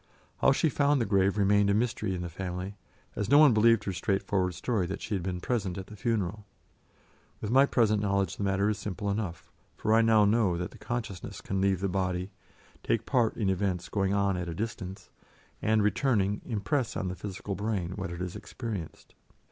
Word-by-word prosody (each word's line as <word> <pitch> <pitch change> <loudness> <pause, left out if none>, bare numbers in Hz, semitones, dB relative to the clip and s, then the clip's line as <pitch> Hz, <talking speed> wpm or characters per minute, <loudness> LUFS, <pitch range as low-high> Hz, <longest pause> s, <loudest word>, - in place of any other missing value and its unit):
How - - +5
she 150 +4 +2
found 145 -1 +2
the 115 - +1
grave 100 0 +2
remained 100 0 +4
a 100 - +3
mystery 110 -4 0
in 90 - -4
the - - -3
family, 90 +2 -5 0.4
as 105 - -2
no 145 - +7
one 150 -4 +7
believed 110 0 +4
her 95 - -3
straightforward 95 -1 0
story 100 -1 -1
that 95 +3 -4
she 110 - -5
had 95 - 0
been 90 0 -3
present 100 -4 -2
at 95 - -5
the 105 - -11
funeral. 105 -2 -1 1.0
With 105 - -4
my 135 +2 +6
present 110 -5 +2
knowledge 100 -1 0
the - - -3
matter 100 +1 +1
is 105 -1 0
simple 100 0 -3
enough, 100 -5 -4 0.3
for 110 - +1
I 115 - +6
now 110 -2 +5
know 100 -4 +2
that 90 +1 -4
the - - -15
consciousness 110 -6 -5
can 95 0 -2
leave 95 -2 +2
the 100 - +1
body, 90 0 -1 0.5
take - - 0
part 120 -4 +1
in 105 - 0
events 95 -2 -1
going 95 -2 0
on 100 -2 +1
at 90 -1 -3
a 85 - -5
distance, 95 -3 -5 0.5
and, 110 -1 +2
returning, 105 -3 +1
impress 120 +3 -1
on 95 - -2
the 90 - -3
physical 100 +2 -5
brain 100 -4 -2
what 95 -1 -4
it 85 0 -6
has 90 -1 -4
experienced. 105 -10 -7
100 Hz, 205 wpm, -29 LUFS, 95-110 Hz, 1.0 s, no